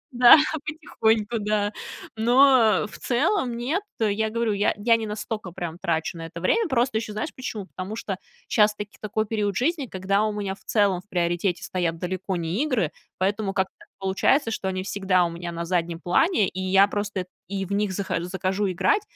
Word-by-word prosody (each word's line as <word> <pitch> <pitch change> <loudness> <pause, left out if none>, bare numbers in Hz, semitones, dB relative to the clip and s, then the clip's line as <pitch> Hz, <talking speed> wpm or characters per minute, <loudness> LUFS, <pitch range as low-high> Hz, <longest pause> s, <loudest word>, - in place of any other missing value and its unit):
Да, 245 0 +10 0.3
потихоньку, 230 -8 0
да. 210 0 0 0.4
Но 235 -3 +5
в - - -12
целом 255 - 0
нет. 290 +12 -1 0.2
Я 220 0 +1
говорю, 230 -1 0
я 205 +1 +1
я 230 +2 +4
не 220 -1 -3
настолько 210 -2 -4
прям 175 0 -6
трачу 165 0 -1
на 165 - -6
это 170 - -8
время. 415 - +2
Просто 245 -2 +1
ещё 220 -2 -6
знаешь, 215 +9 -4
почему? 220 -6 -5
Потому 190 +3 -6
что 195 -4 -4 0.3
щас 210 -1 +3
таки 210 0 -8
такой 215 +1 -1
период 205 -3 -1
жизни, 285 +1 0
когда 195 +1 0
у 215 - +1
меня 200 -2 -3
в - - -16
целом 200 -4 +2
в 205 - -34
приоритете 175 +1 0
стоят 170 -3 -1
далеко 185 +2 -3
не 170 - -1
игры, 235 - 0 0.3
поэтому 195 +1 0
как-то 190 -1 -1
так - - -17
получается, 195 +7 +2
что 195 - -3
они 185 0 -2
всегда 185 -2 +1
у 170 - -3
меня 170 0 -6
на 170 0 -4
заднем 170 -1 -1
плане, 205 - +2
и 190 +2 -5
я 195 +2 +5
просто 205 -2 -2
эт 180 - -9 0.2
и 195 0 -3
в 195 - -10
них 200 -1 0
зах 195 +1 -4
захожу 190 +2 -1
играть. 410 - +2
205 Hz, 195 wpm, -25 LUFS, 185-225 Hz, 0.4 s, Да